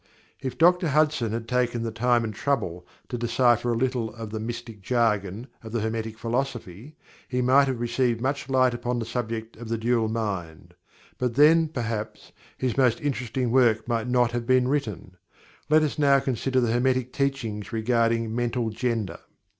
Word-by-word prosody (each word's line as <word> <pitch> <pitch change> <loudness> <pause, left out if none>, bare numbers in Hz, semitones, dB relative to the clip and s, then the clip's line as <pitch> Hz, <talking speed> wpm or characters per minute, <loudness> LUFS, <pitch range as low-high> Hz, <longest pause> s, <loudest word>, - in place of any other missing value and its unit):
If 130 -1 -4
Dr. 175 +1 +4
Hudson 150 -6 +2
had 115 0 -4
taken 120 -2 0
the 115 - -3
time 120 +1 +2
and 110 -1 -3
trouble 90 -8 -2 0.2
to 120 - -4
decipher 120 0 +2
a 115 - 0
little 125 -2 -1
of 115 -2 -7
"the 110 - -4
mystic 115 -1 -6
jargon 105 -2 0 0.2
of 110 0 -9
the 115 - 0
Hermetic 110 0 -3
Philosophy," 120 - -4 0.3
he 125 -1 -1
might 135 +3 +5
have 130 -3 -2
received 120 0 0
much 135 +3 -2
light 130 -1 +3
upon 120 +1 -2
the 115 - -3
subject 115 -1 -4
of 115 -1 -8
"the 115 - 0
dual 115 -1 +1
mind" 95 -8 -4 0.5
but 125 -2 -1
then, 160 +3 +6
perhaps, 115 -6 -5 0.3
his 130 -1 -2
most 125 -4 +3
interesting 130 -3 -2
work 115 -3 +3
might 115 -1 -1
not 125 -1 +2
have 120 -1 -3
been 130 -1 +4
written. 110 - -3 0.5
Let 155 0 +5
us 150 0 -2
now 140 -2 +5
consider 130 -1 0
the 120 -2 +1
Hermetic 125 +1 +1
Teachings 125 -8 -2
regarding 115 0 +1
Mental 120 -1 -1
Gender. 115 -2 -2
120 Hz, 170 wpm, -25 LUFS, 115-130 Hz, 0.5 s, then